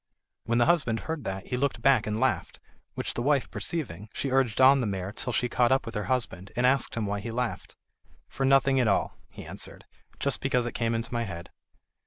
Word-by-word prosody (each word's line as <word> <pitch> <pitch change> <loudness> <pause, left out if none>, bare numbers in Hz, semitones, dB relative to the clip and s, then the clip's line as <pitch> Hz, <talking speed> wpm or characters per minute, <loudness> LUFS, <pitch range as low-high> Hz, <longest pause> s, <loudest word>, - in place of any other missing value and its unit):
When 115 +1 +1
the 120 - +4
husband 125 -10 +2
heard 160 -6 -5
that 95 0 -4
he 125 - -3
looked 130 -3 -1
back 130 -6 +4
and 105 +1 -1
laughed, - - 0 0.4
which - - -3
the - - -3
wife 140 +1 +1
perceiving, 110 - -4
she 135 - -2
urged 130 -5 +2
on 135 +1 +7
the 115 - -1
mare 95 -1 -3
till 125 +4 -4
she 125 - +1
caught 120 +1 +2
up 135 - +2
with 115 - -6
her 105 -2 -3
husband, 115 -7 -2
and 120 - +2
asked 130 0 +2
him 115 -2 -1
why 100 0 -2
he 105 - -6
laughed. 120 0 -3 0.5
"For 135 - -4
nothing 135 0 +4
at 125 - +3
all," 100 - +1
he - - -10
answered; - - -7 0.3
"just - - -1
because 125 -1 +1
it 120 - -2
came 115 -1 -1
into 115 +2 -3
my 120 0 0
head." 85 -4 -8
120 Hz, 225 wpm, -28 LUFS, 110-135 Hz, 0.5 s, on